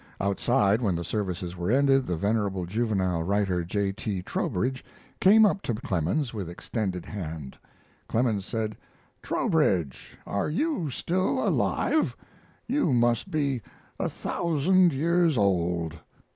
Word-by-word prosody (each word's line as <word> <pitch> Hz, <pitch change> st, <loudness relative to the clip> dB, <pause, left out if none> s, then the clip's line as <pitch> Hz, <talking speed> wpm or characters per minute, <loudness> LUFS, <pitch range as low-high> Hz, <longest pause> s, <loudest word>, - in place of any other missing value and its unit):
Outside, 100 Hz, +2 st, +2 dB
when 100 Hz, -7 st, +1 dB
the 85 Hz, -, -3 dB
services 90 Hz, -1 st, -3 dB
were 90 Hz, +1 st, -3 dB
ended, 135 Hz, +1 st, +3 dB
the 90 Hz, -, 0 dB
venerable 100 Hz, 0 st, 0 dB
juvenile 95 Hz, -4 st, 0 dB
writer, 95 Hz, -1 st, 0 dB
J. 100 Hz, +3 st, -1 dB
T. 100 Hz, -3 st, -4 dB
Trowbridge, 130 Hz, -, -2 dB, 0.4 s
came 215 Hz, +3 st, +7 dB
up 195 Hz, -1 st, +1 dB
to 120 Hz, -, -2 dB
Clemens 105 Hz, -, -1 dB
with 100 Hz, -6 st, -4 dB
extended 90 Hz, 0 st, -4 dB
hand. 80 Hz, -9 st, -6 dB, 0.5 s
Clemens 110 Hz, -4 st, +1 dB
said: 110 Hz, +1 st, -3 dB, 0.5 s
"Trowbridge, 80 Hz, -8 st, 0 dB
are 100 Hz, -, -1 dB
you 185 Hz, -, -1 dB
still 185 Hz, +8 st, 0 dB
alive? 315 Hz, -, +1 dB, 0.5 s
You 250 Hz, -, +1 dB
must 120 Hz, -1 st, +2 dB
be 140 Hz, -5 st, 0 dB, 0.4 s
a -, -, 0 dB
thousand 175 Hz, +2 st, +2 dB
years 165 Hz, +1 st, +2 dB
old. 85 Hz, -5 st, 0 dB
105 Hz, 125 wpm, -27 LUFS, 90-140 Hz, 0.5 s, came